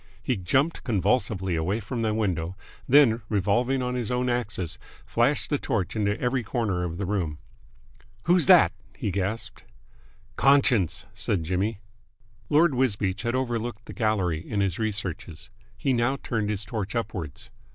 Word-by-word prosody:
He 125 - +1
jumped 130 - +1
convulsively 100 -4 +1
away 90 +7 0
from 115 +3 -4
the 110 -1 +1
window, 95 -5 -1 0.3
then, 125 -4 +6
revolving 120 +6 +1
on 125 0 -2
his 120 -4 -2
own 125 0 0
axis, 105 -8 -2 0.3
flashed 120 +7 +1
the 145 - +2
torch 110 -9 -1
into 105 -1 0
every 125 +1 0
corner 105 -5 -1
of 85 -1 -4
the 100 - -2
room. 90 -6 -1 0.9
"Who's 175 -1 +3
that?" 185 -3 +7 0.3
he 105 - -2
gasped. 100 +4 -3 0.7
"Conscience!" 130 - +3
said 90 -5 -1
Jimmy. 95 +5 -1 0.7
Lord 155 +1 +4
Wisbeach 105 -6 0
had 120 +1 -1
overlooked 120 -3 -2
the - - -9
gallery 100 -8 0
in 100 +5 -4
his 95 -4 0
researches. 100 -6 -4 0.3
He 135 - +1
now 120 +3 +1
turned 110 -4 -1
his 105 -1 -2
torch 110 -2 -4
upwards. 95 - -4
110 Hz, 150 wpm, -26 LUFS, 95-125 Hz, 0.9 s, that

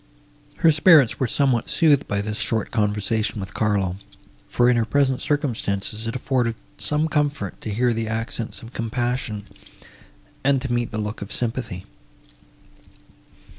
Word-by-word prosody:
Her 165 - +5
spirits 155 -4 +5
were 130 - +1
somewhat 130 -1 +1
soothed 150 -5 +3
by 100 0 0
this 105 +2 -4
short 110 0 -1
conversation 105 0 0
with 95 0 -6
Carlo; 100 -4 0 0.5
for, 120 - +3
in 125 - +5
her 115 - +2
present 130 +3 +1
circumstances, 110 -7 -2
it 115 - -3
afforded 125 -3 0 0.2
some 150 +1 +1
comfort 145 - -1
to - - -5
hear 120 +3 +1
the 115 0 -2
accents 115 +1 -4
of 115 +2 -11
compassion, 115 -3 -2 1.0
and 135 0 +3
to 130 -1 -3
meet 120 -1 0
the 110 - -5
look 105 0 -4
of 100 - -7
sympathy. 115 -6 -3
115 Hz, 145 wpm, -23 LUFS, 105-130 Hz, 1.0 s, Her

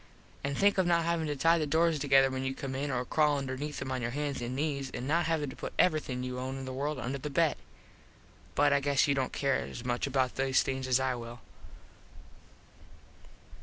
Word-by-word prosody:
An 140 0 -2
think 200 +4 +3
of 185 - +3
not 170 -1 +3
havin 170 -2 0
to 145 - -2
tie 165 +4 +3
the 155 - -1
doors 160 +1 +2
together 135 -1 +4
when 130 0 -3
you 135 0 -2
come 135 -2 -5
in 140 +2 -2
or 125 -2 -1
crawl 150 +1 +2
underneath 140 +2 -4
em 130 - -5
on 130 -1 -2
your 120 - -1
hans 145 +1 -3
and 120 +1 -3
nees 140 -2 -2
and 125 - -5
not 165 +2 +2
havin 160 -3 0
to - - -11
put - - -6
everything 145 -7 +1
you 125 0 -4
own 130 +1 -4
in 135 - -6
the 130 - -5
world 145 +3 -2
under 130 +2 -3
the 150 - -5
bed. 160 +2 +2 1.0
But 145 0 +4
I 140 - +4
guess 140 +1 +2
you 140 - +3
dont 135 -2 -1
care 140 -1 +1
as 120 - -6
much 120 +2 -1
about 130 -2 0
these 135 0 +3
things 130 -1 -3
as 130 0 +3
I 130 -1 0
will. 120 -1 -8
135 Hz, 225 wpm, -30 LUFS, 130-150 Hz, 1.0 s, together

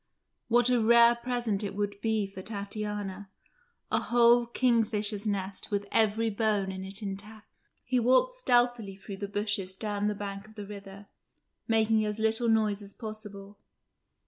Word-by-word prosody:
What 240 +1 +3
a 245 -2 +3
rare 235 +1 +6
present 235 -4 -2
it 200 -1 -4
would 205 0 -3
be 220 -2 +1
for 195 -1 -9
Tatiana 205 -1 -5 0.6
a - - +3
whole 240 0 +4
kingfisher's 220 -4 +1
nest 195 -1 -3
with 205 -1 -1
every 220 +1 +2
bone 205 -2 0
in 190 0 -6
it 195 +3 -7
intact. 205 +2 -7 0.4
He 255 0 +1
walked 260 - +3
stealthily 245 - +1
through 195 0 -9
the 200 - -4
bushes 205 -2 -2
down 205 0 -2
the 210 0 0
bank 200 0 -6
of 215 - -17
the 205 -2 -7
river, 200 0 -10 0.6
making 220 -1 +3
as 210 0 -2
little 220 +1 +1
noise 215 -2 +2
as 200 0 -10
possible. 210 -2 -8
210 Hz, 155 wpm, -29 LUFS, 200-230 Hz, 0.6 s, rare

